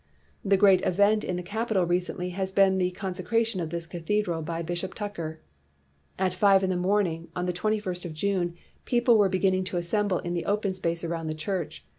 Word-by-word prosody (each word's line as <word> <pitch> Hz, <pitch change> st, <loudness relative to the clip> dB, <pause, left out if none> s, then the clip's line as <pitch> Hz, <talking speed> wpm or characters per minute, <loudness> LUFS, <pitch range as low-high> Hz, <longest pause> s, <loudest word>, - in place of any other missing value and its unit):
"The 195 Hz, 0 st, +3 dB
great 195 Hz, -1 st, +5 dB
event 205 Hz, +3 st, +3 dB
in 180 Hz, -, -2 dB
the 180 Hz, -, -4 dB
cajntal 210 Hz, -2 st, 0 dB
recently 180 Hz, +1 st, -1 dB
has 190 Hz, +1 st, -3 dB
been 190 Hz, -1 st, +4 dB
the 180 Hz, -1 st, +2 dB
consecration 190 Hz, +3 st, -1 dB
of 165 Hz, -, -3 dB
this 170 Hz, 0 st, -4 dB
cathedral 175 Hz, 0 st, -1 dB
by 165 Hz, +1 st, -3 dB
Bishop 175 Hz, +3 st, -4 dB
Tucker. 170 Hz, -7 st, -5 dB, 0.8 s
At 185 Hz, -1 st, +1 dB
five 195 Hz, +1 st, +4 dB
in 190 Hz, -, +1 dB
the -, -, 0 dB
morning 180 Hz, -3 st, 0 dB
of 180 Hz, -, -1 dB
the 180 Hz, -, -1 dB
twenty 215 Hz, +5 st, 0 dB
first 185 Hz, -4 st, -4 dB
of 165 Hz, -3 st, -6 dB
June, 175 Hz, 0 st, -1 dB, 0.3 s
people 240 Hz, -1 st, +4 dB
were 205 Hz, -3 st, +4 dB
be 185 Hz, -, 0 dB
ginning 185 Hz, -1 st, +2 dB
to 180 Hz, -, -3 dB
assemble 185 Hz, +2 st, 0 dB
in 175 Hz, 0 st, -4 dB
the 170 Hz, -, -2 dB
open 205 Hz, -1 st, 0 dB
space 170 Hz, -2 st, -2 dB
around 165 Hz, -1 st, -3 dB
the 155 Hz, -, -2 dB
church. 155 Hz, -, -4 dB
185 Hz, 205 wpm, -27 LUFS, 175-200 Hz, 0.8 s, great